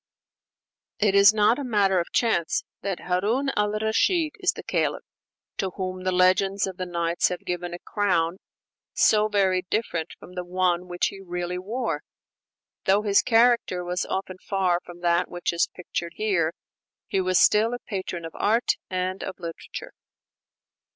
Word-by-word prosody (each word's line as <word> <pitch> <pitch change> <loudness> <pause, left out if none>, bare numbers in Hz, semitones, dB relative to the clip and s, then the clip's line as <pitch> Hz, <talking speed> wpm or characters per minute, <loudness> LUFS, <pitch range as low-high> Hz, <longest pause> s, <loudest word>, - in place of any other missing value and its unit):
It 205 -2 +2
is 200 0 +8
not 215 +4 +3
a - - -3
matter 200 -6 +2
of 170 - -3
chance 195 -9 +1 0.2
that 195 -2 -3
Harun 215 +10 0
al 210 0 +2
Rashid 220 - +1
is 370 -1 +2
the - - -9
Caliph - - -1 0.5
to 190 - -1
whom 185 -1 -4
the 185 - +2
legends 185 +2 +3
of 190 -2 -6
the 185 -1 -4
'Nights' 170 -1 +1
have 180 - -4
given 175 0 -3
a 175 - -5
crown 180 -3 0 0.6
so 215 0 +4
very 195 -3 +2
different 175 -7 -1
from 180 - -13
the 180 0 -4
one 180 0 0
which 175 0 0
he 195 - -10
really 180 -1 -4
wore. 205 -5 -3 0.8
Though 200 +2 +3
his 200 -2 +4
character 230 -6 +3
was 180 +1 -2
often 190 -1 -3
far 185 -3 0
from 175 0 -12
that 175 0 +2
which 175 0 -2
is 170 - +1
pictured 170 -1 -5
here, 190 -7 +1 0.5
he 195 - 0
was 185 -1 +2
still 215 +2 +5
a 245 - -11
patron 185 -4 -4
of 165 - -8
art 230 +4 +2 0.2
and 185 +1 -2
of 190 - -5
literature. 165 -1 -7
185 Hz, 165 wpm, -25 LUFS, 175-210 Hz, 0.8 s, is